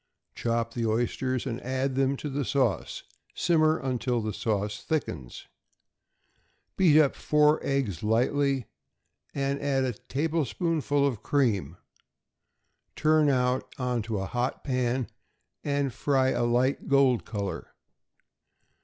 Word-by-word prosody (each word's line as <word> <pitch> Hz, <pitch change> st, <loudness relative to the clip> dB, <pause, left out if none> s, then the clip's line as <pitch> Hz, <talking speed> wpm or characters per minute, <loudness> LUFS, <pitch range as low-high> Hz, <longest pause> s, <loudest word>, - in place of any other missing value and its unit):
Chop 115 Hz, 0 st, -1 dB
the 115 Hz, -2 st, -1 dB
oysters, 120 Hz, +3 st, -1 dB
and 120 Hz, -2 st, -4 dB
add 130 Hz, +1 st, -1 dB
them 135 Hz, +1 st, +1 dB
to 150 Hz, -, -5 dB
the 140 Hz, 0 st, -2 dB
sauce; 125 Hz, -, -1 dB, 0.3 s
simmer 160 Hz, -2 st, +3 dB
until 125 Hz, -2 st, -1 dB
the 110 Hz, -1 st, -3 dB
sauce 105 Hz, -1 st, -2 dB
thickens. 70 Hz, -, -4 dB, 1.3 s
Beat 160 Hz, -5 st, +5 dB
up 145 Hz, -3 st, +4 dB
four 150 Hz, 0 st, +3 dB
eggs 125 Hz, -, -1 dB
lightly, 130 Hz, +4 st, +1 dB, 0.7 s
and 140 Hz, 0 st, -1 dB
add 140 Hz, -2 st, +1 dB
a 125 Hz, -2 st, -1 dB
tablespoonful 150 Hz, -, -1 dB
of 125 Hz, -7 st, -1 dB
cream; 100 Hz, -, 0 dB, 1.2 s
turn 155 Hz, -1 st, +3 dB
out 125 Hz, -1 st, 0 dB
into 120 Hz, -4 st, -2 dB
a 95 Hz, -, -2 dB
hot 125 Hz, +5 st, -2 dB
pan, 125 Hz, -2 st, 0 dB, 0.6 s
and 140 Hz, -3 st, -1 dB
fry 130 Hz, 0 st, +1 dB
a 120 Hz, -, 0 dB
light 125 Hz, +3 st, +1 dB
gold 135 Hz, -3 st, +3 dB
color. 100 Hz, -5 st, -5 dB
130 Hz, 120 wpm, -27 LUFS, 115-140 Hz, 1.3 s, Beat